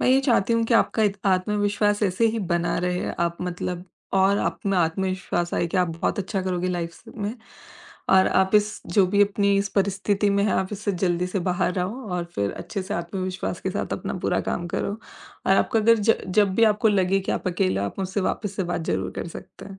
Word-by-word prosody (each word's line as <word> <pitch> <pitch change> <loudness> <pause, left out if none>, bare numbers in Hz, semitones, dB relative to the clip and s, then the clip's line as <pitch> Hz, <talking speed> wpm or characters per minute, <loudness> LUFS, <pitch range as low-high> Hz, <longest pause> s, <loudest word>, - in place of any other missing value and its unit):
मैं - - +2
ये 260 +1 +5
चाहती 235 -5 +2
हूँ 230 0 +2
कि 230 - +1
आपका 225 -1 +3
इत 200 -1 +1
आत्मविश्वास 205 +2 +1
ऐसे 200 +3 +2
ही - - -1
बना 170 0 +1
रहे 180 0 -1
आप 170 0 0
मतलब 180 0 -4 0.3
और 195 +1 +4
आप - - -2
में 195 -1 +2
आत्मविश्वास 175 0 -1
आए - - +1
कि 170 - -3
आप 180 -1 +2
बहुत 170 - -1
अच्छा 195 0 -2
करोगे 185 -1 -1
लाइफ 170 -2 -2
स - - -18
में। 210 +1 -3 0.8
और 190 0 +6
आप 190 +2 +2
इस 210 0 +2 0.2
जो 195 -2 +6
भी 200 +2 +4
अपनी 200 0 +2
इस 200 +1 0
परिस्थिति 200 +1 +1
में 200 0 +2
हैं, 210 - +1
आप 190 - 0
इससे 210 0 -2
जल्दी 180 -1 0
से 180 +2 -2
बाहर 180 0 0
आओ 195 +8 -2
और 180 -1 -1
फिर 100 0 -1
अच्छे 195 - -5
से 195 +3 -4
आत्मविश्वास 185 +2 -3
के - - -2
साथ - - -3
अपना - - -4
पूरा - - +1
काम 175 - -2
करो 200 - -2 0.5
और - - +5
आपका 225 - +2
अगर 230 +1 +5
ज 220 +2 +4
जब 195 0 +3
भी 230 - +5
आपको 215 +1 +3
लगे 195 -1 +2
कि 190 - -2
आप - - -2
अकेले 95 - 0
हो, 100 - 0
आप - - -8
मुझसे 190 +1 -2
वापस 200 +1 -2
से 190 - -1
बात - - -1
ज़रूर - - -1
कर - - -4
सकते - - -11
हैं। 195 -1 -11
190 Hz, 230 wpm, -24 LUFS, 180-205 Hz, 0.8 s, और